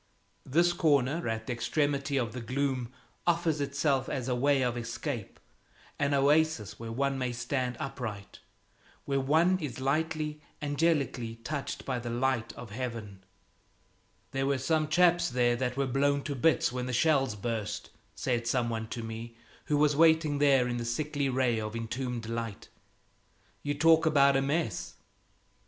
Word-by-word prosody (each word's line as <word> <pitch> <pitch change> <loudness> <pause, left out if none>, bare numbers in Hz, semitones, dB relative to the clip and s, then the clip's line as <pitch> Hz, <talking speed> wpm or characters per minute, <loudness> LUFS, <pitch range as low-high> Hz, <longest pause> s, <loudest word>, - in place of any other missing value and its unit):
This 170 +6 +3
corner 155 -3 +2
at 110 0 -3
the 125 - -2
extremity 140 +2 0
of 115 -4 -1
the 125 - -5
gloom 130 0 -1 0.4
offers 165 -3 +2
itself 140 -1 0
as 130 -2 -3
a 130 - +1
way 135 +2 +2
of 125 -1 0
escape, 120 -1 -5 0.6
an 145 0 +2
oasis 145 -5 +2
where 115 0 -6
one 135 +3 0
may 125 -1 -1
stand 125 +1 -2
upright, 120 -9 -6 0.7
where 140 -1 0
one 160 +7 +3
is 140 -7 -5
lightly, 150 +2 -1 0.2
angelically 145 -6 0
touched 145 0 -4
by 130 -2 -1
the 120 0 -5
light 120 -1 0
of 120 -4 -10
heaven. 110 -5 -5 1.1
"There 135 0 -1
were 140 -1 +2
some 155 +3 +1
chaps 175 +2 +4
there 120 -1 +2
that 125 0 -2
were 140 - +1
blown 140 +2 +1
to 145 - -3
bits 160 +3 +2
when 125 0 -3
the 130 - -3
shells 135 -3 +2
burst," 110 0 -4 0.2
said 120 -2 -1
some 120 -1 +1
one 110 -1 -3
to 115 +1 -5
me 115 +1 -7 0.3
who 150 - +1
was 150 0 +3
waiting 160 -2 +4
there 135 -3 +4
in 120 0 -2
the 120 - -3
sickly 140 +4 -1
ray 125 -3 +1
of 110 +1 -5
entombed 120 +1 -3
light. 115 -2 -5 0.9
"You 145 0 -2
talk 160 +2 +5
about 140 -3 +5
a 135 - +3
mess! 140 - -2
135 Hz, 160 wpm, -30 LUFS, 120-145 Hz, 1.1 s, talk